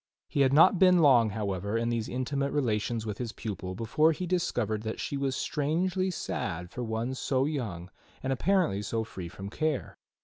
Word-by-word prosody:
He 140 - +1
had 135 -1 +4
not 165 +5 +6
been 185 -1 +6
long, 130 -9 +6
however, 100 0 -2
in 115 +1 0
these 115 -2 -1
intimate 140 +2 -1
relations 115 -4 0
with 105 -2 -5
his 120 -3 -4
pupil 95 -4 -5
before 150 - +2
he 180 - -4
discovered 120 - 0
that 110 0 -4
she - - -3
was 135 -1 -1
strangely 180 +7 0
sad 90 - -4
for 125 - -5
one 115 +3 -2
so 130 0 0
young 105 - -4 0.3
and 135 0 0
apparently 165 - +1
so 110 +2 -2
free 95 -5 -7
from 95 +3 -8
care. 155 -1 -2
125 Hz, 180 wpm, -29 LUFS, 110-150 Hz, 0.3 s, not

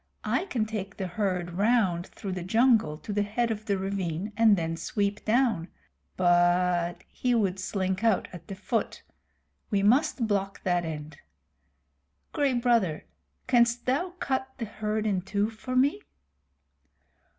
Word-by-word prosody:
I - - 0
can 235 - -1
take 210 -2 -5
the 195 - -3
herd 180 -2 -2
round 190 -3 +2
through 195 - -7
the 185 -1 -3
jungle 220 -5 +3
to 205 - -6
the 205 - +1
head 225 +3 0
of 215 0 -4
the 200 -2 +1
ravine 190 0 -3
and 220 -2 +5
then 165 -1 -2
sweep 200 +5 -2
down 225 -7 +2 0.5
but 175 -1 +2
he 250 -1 0
would 195 -4 +1
slink 190 +1 -2
out 225 -4 +2
at 170 -2 -10
the 195 - -6
foot. 220 +4 -2 0.7
We 200 -1 +1
must 255 +3 +3
block 195 -2 -2
that 175 -2 +1
end. 150 -1 -6 1.2
Gray 280 -3 +2
Brother, 235 -10 +1 0.4
canst 240 -1 +3
thou 345 +8 0
cut 265 0 -1
the 235 - -3
herd 215 0 -3
in 195 -4 +1
two 205 +3 -1
for 255 +3 -6
me?" 255 - +3
205 Hz, 150 wpm, -27 LUFS, 180-230 Hz, 1.2 s, and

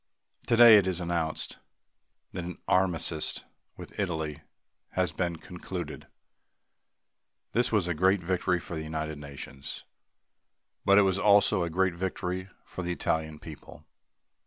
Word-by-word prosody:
Today, 115 -2 +9
it 95 -2 +3
is 90 -2 0
announced 85 -2 -3 0.7
that 90 - -5
an 90 +1 -6
armistice 85 -4 +2 0.3
with - - -10
Italy 80 -6 -2 0.5
has 90 -3 +1
been 85 0 -2
concluded. - - -7 1.4
This 120 +1 +1
was 105 -6 +2
a 90 - 0
great 95 +3 +2
victory 90 0 0
for 85 - -8
the 80 - -3
United 80 -1 -4
Nations 70 -1 -8 1.0
but 100 0 +6
it 105 - +7
was 95 0 +1
also 100 -2 +4
a 85 - -1
great 95 +2 +1
victory 90 +1 -3 0.2
for - - -7
the 90 0 -3
Italian 80 -2 -2
people. 75 -1 -12
90 Hz, 135 wpm, -28 LUFS, 80-95 Hz, 1.4 s, Today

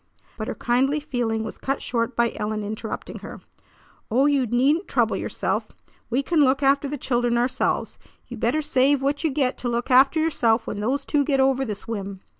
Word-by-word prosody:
But 215 -1 -5
her - - -4
kindly 265 +5 +1
feeling 235 -6 -2
was 220 - -7
cut 275 +1 -2
short 235 0 -2
by 235 -1 +1
Ellen 215 0 -3
interrupting 215 +2 -6
her. - - -9 0.7
"Oh, 255 +5 +3
you 280 -4 +2
needn't 275 - +2
trouble - - +1
yourself! - - -2 0.4
We 255 +4 0
can 335 +2 +1
look 270 +1 +2
after 280 +1 +3
the 290 +1 -4
children 240 -2 0
ourselves. 250 +2 -1 0.3
You - - -8
better 310 0 0
save 275 -1 +3
what 285 +3 0
you 320 - +2
get 265 -2 0
to 245 - -2
look 240 +2 -2
after 270 +5 +5
yourself 235 -8 +1
when 205 - -5
those 265 +6 -1
two 290 -2 +1
get 275 -1 +1
over 265 0 +3
this 210 -5 -6
whim!" 200 -4 -5
255 Hz, 195 wpm, -23 LUFS, 230-280 Hz, 0.7 s, after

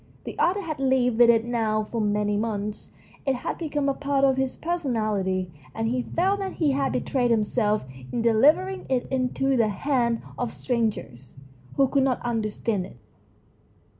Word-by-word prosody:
The - - -7
author 385 +3 +2
had 310 -4 -4
lived 255 -3 +2
with 240 -1 +7
it 230 -1 +4
now 220 -3 0
for 225 +2 -3
many 210 0 +1
months 210 -1 -3 0.3
it 270 -1 +1
had 250 - -4
become 295 -4 -1
a 275 - +2
part 280 0 0
of 265 -1 +3
his 265 -1 -1
person 330 -7 -2
ality, 190 -4 -1 0.2
and 225 0 -1
he 250 +2 0
felt 380 +9 0
that 385 -1 -3
he 305 -4 +1
had 270 -1 0
betrayed 250 -3 0
himselt 215 -1 +1 0.3
in 235 - -1
delivering 300 +12 +3
it 255 -2 +1
into 265 +1 +1
the 230 -3 +3
hands 235 +2 0 0.2
of 245 -2 -1
strangers 215 - -3 0.4
who 275 -1 +4
could 275 +1 +2
not 265 -2 +1
understand 215 -4 -1
it. - - -16
245 Hz, 170 wpm, -25 LUFS, 215-275 Hz, 0.4 s, with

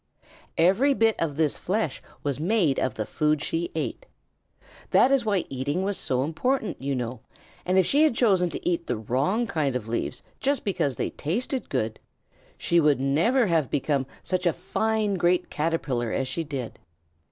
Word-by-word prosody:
Every 220 +12 +4
bit 225 -2 +3
of 155 -4 -1
this 155 -3 +1
flesh 185 -7 -2 0.2
was 140 -2 -2
made 170 -5 +2
of 130 - -1
the 110 - -2
food 150 +3 0
she 170 +1 -2
ate. - - -3 0.8
That 265 - +5
is 270 -4 +3
why 200 -4 +1
eating 140 +7 -2
was 200 +1 -1
so 130 -6 0
important, 220 - -1
you 140 0 -1
know, 120 -1 -3 0.5
and 185 +1 +2
if 190 - +5
she 290 - +3
had 310 -6 +4
chosen 190 -7 +3
to - - -5
eat 170 -1 0
the 120 - -1
wrong 140 - 0
kind 145 - -1
of 120 -3 -3
leaves 115 +1 -3 0.2
just 275 -2 0
because 150 -9 0
they - - -2
tasted 245 - -2
good, 110 -4 -2 0.6
she 170 - +2
would 150 -4 +3
never 165 - +3
have 165 -7 +1
become 140 -2 0 0.2
such 185 0 0
a 170 - +3
fine 210 +2 0
great 175 0 +1
Caterpillar 145 -7 -1
as 135 - -1
she 145 +6 -3
did. 140 -6 -6
165 Hz, 175 wpm, -26 LUFS, 135-210 Hz, 0.8 s, That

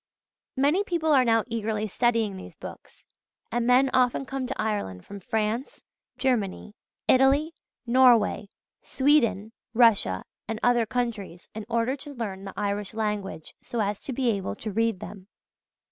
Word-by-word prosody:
Many 295 +9 +3
people 330 -5 +1
are 265 -2 +6
now 225 -2 +3
eagerly 220 -2 -2
studying 225 -1 +1
these 185 - -10
books; - - -11 0.5
and 240 0 0
men 255 +2 +4
often 255 +1 +2
come 265 -1 -4
to 270 - -5
Ireland 205 - -2
from 200 0 -9
France, 220 +6 -2 0.3
Germany, 215 -5 -1 0.3
Italy, 275 +5 +4 0.3
Norway, 235 -4 +4 0.3
Sweden, 250 -7 +2 0.2
Russia, 220 - +4 0.2
and 225 0 -3
other 240 -2 +3
countries, 220 -7 -4
in 215 -1 -7
order 235 +3 +1
to 285 +1 -9
learn 195 -5 -5
the 195 - -7
Irish 205 0 -2
language 210 -6 -3
so 235 - -5
as 205 -1 -1
to - - -5
be 250 -1 +1
able 195 - -3
to 215 - -6
read 225 -2 0
them. 195 -2 -9
230 Hz, 145 wpm, -26 LUFS, 205-255 Hz, 0.5 s, are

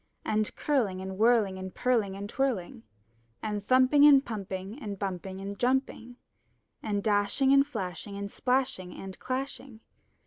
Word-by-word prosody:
And 215 0 0
curling 230 -11 0
and 190 0 -5
whirling 220 -5 +3
and 185 -1 -7
purling 225 -6 +1
and 200 +1 -5
twirling. 220 - -2 0.6
And 210 -2 -3
thumping 260 +5 +5
and 285 -2 +7
plumping 200 +2 -6
and 205 -4 -5
bumping 190 -1 -4
and 200 +1 -6
jumping. 245 -1 -1 0.7
And 205 -2 -2
dashing 210 +6 +2
and 275 0 +5
flashing 200 - -5
and 200 0 -5
splashing 250 -8 -1
and 190 -1 -9
clashing. 260 -2 -5
210 Hz, 140 wpm, -29 LUFS, 195-255 Hz, 0.7 s, and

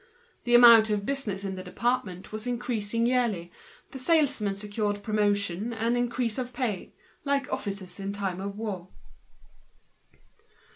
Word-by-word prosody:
The 240 0 +4
amount 230 -2 +9
of 205 -1 -1
business 215 -8 -2
in 195 -1 -3
the 185 0 -6
department 210 -1 -2
was 215 +2 -4
increasing 230 -2 -1
yearly, 235 -9 0 0.4
the 265 - -8
salesmen 280 -8 +2
were 205 +1 -2
promoted 205 -3 +1
and 225 +4 -3 0.2
their 245 0 +1
salaries 235 -2 -1
doubled, 245 -6 -3 0.4
like 280 -2 0
officers 200 -2 -5
in 195 0 -3
time 195 -2 -3
of 200 +1 -5
war. 200 -5 -4
215 Hz, 135 wpm, -27 LUFS, 200-245 Hz, 0.4 s, amount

